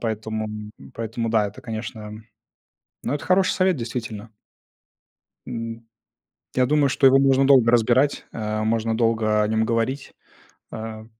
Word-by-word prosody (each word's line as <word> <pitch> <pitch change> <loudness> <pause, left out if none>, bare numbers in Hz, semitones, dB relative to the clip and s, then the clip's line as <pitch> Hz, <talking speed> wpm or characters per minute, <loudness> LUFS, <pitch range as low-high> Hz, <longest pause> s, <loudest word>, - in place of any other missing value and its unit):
поэтому 110 -1 -3 0.5
поэтому, 115 0 -3
да, 110 -2 +2
это, 100 - -13
конечно. 110 -1 -7 0.8
Ну, - - -2
это 145 - -4
хороший 185 0 +3
совет, 185 -4 +2
действительно. 115 -2 -5 1.2
М, 115 -1 -6 0.7
я 130 0 +3
думаю, 145 0 +2
что 135 +1 +1
его 135 +1 +6
можно 135 0 +4
долго 130 -4 +5
разбирать, 120 +4 +2
а. 110 -1 -3
Можно 115 0 0
долго 110 -2 +2
о 105 - +1
нем 110 0 +1
говорить, 115 +4 -2 0.6
а. 110 0 -7
115 Hz, 135 wpm, -23 LUFS, 110-130 Hz, 1.2 s, его